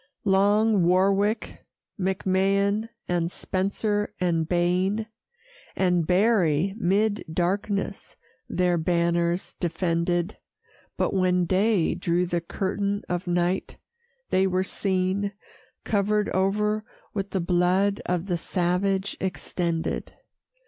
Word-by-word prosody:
Long 205 +1 +3
Warwick, 195 +5 +1 0.4
McMahan, 195 +3 +1 0.2
and 175 -1 0
Spencer, 205 +3 -1
and 165 -3 0
Baen, 180 +5 +1 0.7
And 180 -4 +2
Berry, 185 -3 +3
'mid 205 +2 +1
darkness 195 +4 -2 0.3
their 180 -1 +1
banners 170 +1 0
defended, 175 +1 -1 0.6
But - - 0
when 180 -2 +2
day 190 0 +2
drew 175 0 0
the 175 -1 -1
curtain 200 +3 -2
of 180 0 -2
night, 175 +2 0 0.5
they 190 +1 +3
were 185 0 +1
seen 190 +1 -1 0.5
Cover'd 210 0 +1
o'er 210 +3 +1 0.3
with 200 -1 -3
the 190 - -1
blood 180 +3 +2
of 180 -1 0
the 175 -3 -1
savage, 190 +3 0
extended. 170 -3 -2
185 Hz, 100 wpm, -25 LUFS, 175-200 Hz, 0.7 s, Long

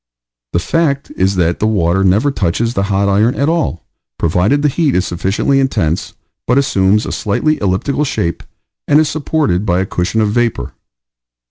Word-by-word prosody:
The - - +2
fact 140 - -1
is 95 +1 +1
that 85 -1 0
the 110 - +1
water 95 -3 +1
never 105 +10 +2
touches 115 +2 -1
the 95 - -1
hot 100 0 +1
iron 105 +5 +2
at 140 - 0
all, 160 - -1 0.3
provided 90 - +1
the - - +4
heat 145 0 0
is 90 - +1
sufficiently 95 +10 0
intense, 85 - -1 0.3
but 125 - +2
assumes 105 -6 +2
a - - -4
slightly 155 +9 -1
elliptical 100 +9 0
shape 85 - -2 0.5
and 145 +1 +4
is 155 - +2
supported 150 - -1
by 90 -4 +1
a 95 - 0
cushion 90 +4 -2
of 105 -1 +1
vapor. 120 0 -1
105 Hz, 170 wpm, -15 LUFS, 95-140 Hz, 0.5 s, the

